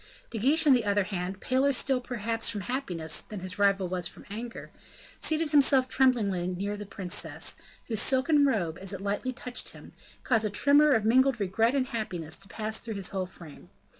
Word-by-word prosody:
De 225 - -4
Guiche, 300 +8 +2
on 285 - +7
the 245 -3 +3
other 205 -1 +2
hand, 185 -1 -4
paler 265 +5 +2
still 265 -1 +1
perhaps 230 -2 -2
from 210 -3 -3
happiness, 180 - -2
than 210 -3 -8
his 185 +2 -4
rival 200 -2 +3
was 180 -1 -2
from - - -12
anger, 230 +3 -7 0.5
seated 315 -1 0
himself 275 -3 +5
tremblingly 220 -10 +2
next 180 -1 -4
to 205 +1 -2
the 205 -1 -8
princess, 190 -3 -3 0.3
whose 220 -3 0
silken 285 +3 +3
robe, 180 - 0
as 195 +1 -2
it 195 - -6
lightly 205 +6 -2
touched 250 -1 -4
him, - - -14 0.3
caused 225 -3 +2
a 215 - 0
tremor 285 +8 +5
of 220 -3 +1
mingled 260 +2 +4
regret 220 +6 +1
and 260 -2 0
happiness 180 - -4
to 195 - -14
pass 220 +2 -2
through 225 -2 -6
his 195 -2 -4
whole 190 -2 -3
frame. 170 -5 -14
220 Hz, 195 wpm, -28 LUFS, 195-255 Hz, 0.5 s, on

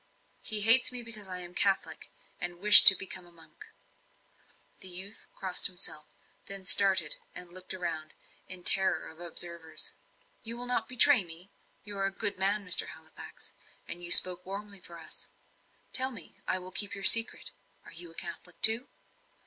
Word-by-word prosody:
"He 215 -1 -1
hates 230 +5 +7
me 250 -1 -6
because 215 -3 -9
I 180 -1 -9
am 175 -1 -13
a - - -25
Catholic, 195 +1 -2 0.3
and 175 0 -7
wish 210 +2 +8
to 195 - +11
become 185 -1 -8
a - - -23
monk." 165 -1 -17 1.1
The 190 - -5
youth 190 +4 -4
crossed 185 -2 0
himself, 175 -5 -6 0.4
then 195 -1 -6
started 190 -5 +1 0.2
and 180 -1 -12
looked 185 +1 -9
round, 165 -4 -7 0.3
in 185 -1 -8
terror 190 +1 +3
of 160 - -20
observers. 170 -1 -1 0.5
"You 230 0 -6
will 245 - -6
not 250 0 -4
betray 255 -2 +3
me? 170 +3 -9 0.3
You 205 -1 -6
are 195 - -1
a - - -4
good 200 -1 -4
man, 200 +2 -2
Mr. 180 - +3
Halifax, - - -14 0.3
and 175 - -9
you 175 - -8
spoke 180 +1 +6
warmly 200 0 -10
for 170 0 -12
us. 165 - -11 0.6
Tell 260 0 +4
me 225 -11 -14
I - - -3
will 185 0 -14
keep 205 +1 -2
your 195 - -12
secret 230 +3 +4 0.3
are - - -15
you 170 0 -8
a 165 - -20
Catholic 175 0 -7
too?" 225 +4 +3
190 Hz, 175 wpm, -26 LUFS, 175-205 Hz, 1.1 s, to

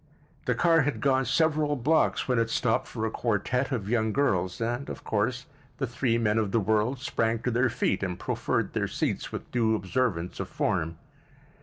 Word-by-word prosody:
The - - +1
car 165 -2 +4
had 145 +1 -1
gone 135 -2 +2
several 150 +2 +2
blocks 150 +5 +2
when 125 -3 +2
it 115 0 +1
stopped 115 -1 +1
for 110 -2 -3
a 110 - -1
quartet 125 +5 0
of 110 -7 -2
young 110 -1 +1
girls, 95 -10 +1
and, 120 +4 -2
of - - -7
course, 115 +4 -1 0.3
the 135 - -1
three 120 -1 0
men 110 -1 +2
of 105 -3 -1
the 115 - +3
world 110 +5 +1
sprang 115 -3 0
to 125 - 0
their 125 +2 +2
feet 115 -5 0
and 90 -2 -2
proffered - - -1
their - - 0
seats - - -2
with - - -7
due 115 -2 +2
observance 95 -4 -1
of - - -4
form. 80 +1 -1
115 Hz, 190 wpm, -27 LUFS, 110-130 Hz, 0.3 s, car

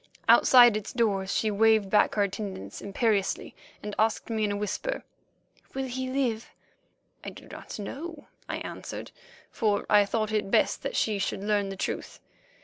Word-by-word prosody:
Outside 240 -3 +7
its 215 0 -4
doors 200 -5 0
she 215 - +1
waved 215 -1 +3
back 210 - +3
her 205 - +3
attendants 195 - -5
imperiously 200 0 -1 0.3
and 210 0 -5
asked 220 +1 +1
me 220 -1 0
in 205 - -1
a 205 - -2
whisper: 210 - -3 0.7
"Will 270 0 -2
he 260 0 -4
live?" 250 -4 -1 0.7
"I - - -5
do - - -13
not - - -9
know," 290 - -7 0.2
I - - -2
answered, - - -7 0.4
for 210 -5 0
I 205 -1 +6
thought 215 +1 -1
it 210 -2 -1
best - - +2
that - - -4
she 210 -2 +1
should 195 0 -2
learn 205 -1 +1
the 195 - -5
truth. - - -4
215 Hz, 165 wpm, -27 LUFS, 200-235 Hz, 0.7 s, Outside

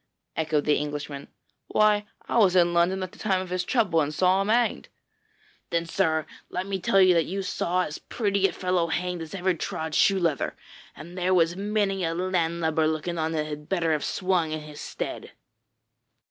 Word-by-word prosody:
echoed 155 -2 0
the 150 - +3
Englishman. 145 -1 -5 0.4
'Why, 210 -1 +3 0.2
I - - +2
was 190 -4 +4
in 175 -1 +4
London 180 +3 +2
at 185 - -6
the - - -17
time 190 -3 +1
of 185 -1 -6
his 180 0 0
trouble 195 -8 +2
and 145 0 -1
saw 185 +4 +3
him 195 - -2
hanged.' 235 +2 +1 0.8
'Then, 170 0 0
sir, 160 -2 0 0.2
let 180 +1 -3
me 195 -1 -3
tell 195 +2 +3
you 185 -1 +6
that 165 -2 +2
you 195 +2 -3
saw 180 0 0
as 150 - -6
pretty 200 -3 0
a - - -5
fellow 180 -1 0
hanged 180 +1 -2
as 160 +3 -7
ever 185 0 +1
trod 160 -1 -4
shoe 195 +4 +4
leather, 165 -7 0 0.4
and 170 +5 -10
there 185 0 +1
was 170 -1 +3
many 200 -1 0
a 165 0 -1
landlubber 170 -3 0
looking 160 +2 -2
on 160 0 0
that 155 -1 -1
had 150 0 -7
better 170 -4 +1
have 150 -2 0
swung 180 -4 0
in 155 0 -3
his 150 -1 -10
stead.' - - -6
175 Hz, 195 wpm, -26 LUFS, 160-190 Hz, 0.8 s, you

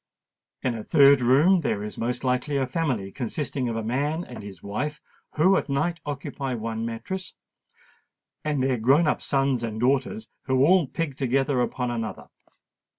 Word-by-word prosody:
In 130 - +1
a 110 -2 -5
third 140 +1 +6
room 145 +10 +5
there 105 -10 -1
is 105 - -6
most 120 +2 -3
likely 130 +3 0
a 135 - +1
family 130 - -2
consisting 130 +1 -3
of 115 - -3
a 115 - -2
man 145 +8 -1
and 125 - -9
his 100 -4 -10
wife, 145 +9 -3 0.4
who 185 +5 +5
at - - -2
night 160 +5 -1
occupy 140 -2 -4
one 115 0 -3
mattress, 150 +11 -5 1.1
and 150 -4 0
their 130 -1 +1
grown 135 +9 +4
up - - +1
sons 135 -3 +1
and 110 -2 -4
daughters 140 - 0 0.2
who 130 0 +3
all 180 -2 +4
pig 145 -2 -3
together 135 0 +1
upon 125 0 -1
another. 115 -2 -5
130 Hz, 165 wpm, -25 LUFS, 120-150 Hz, 1.1 s, third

